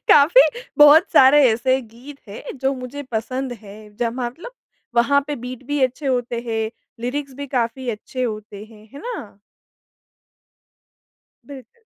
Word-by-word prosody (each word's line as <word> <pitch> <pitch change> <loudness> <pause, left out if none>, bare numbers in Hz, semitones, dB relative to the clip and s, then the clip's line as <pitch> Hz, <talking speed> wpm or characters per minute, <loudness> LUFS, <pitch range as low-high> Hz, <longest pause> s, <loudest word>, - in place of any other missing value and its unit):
काफ़ी 300 +12 +7 0.4
बहुत 300 +5 +7
सारे 275 +2 +7
ऐसे 260 +3 +1
गीत 245 +6 -14
है 200 - -9 0.2
जो 270 +1 +2
मुझे 255 +3 -7
पसंद 255 +3 -3
हैं 205 0 -12 0.2
ज 235 -1 -1
मतलब 260 - -6 0.4
वहाँ 280 +4 +4
पे 295 - -3
बीट 250 0 -7
भी 290 0 -1
अच्छे 260 +3 -4
होते 245 -2 -1
हैं, 220 -1 -2 0.3
लिरिक्स 270 +3 -4
भी 285 +1 -6
काफ़ी 245 +1 -1
अच्छे 235 +4 -6
होते 215 -3 -5
हैं, 215 -1 -17
है 280 - -10
ना? 290 - -7 2.1
बिल्कुल। 280 - -13
255 Hz, 140 wpm, -21 LUFS, 230-285 Hz, 2.1 s, काफ़ी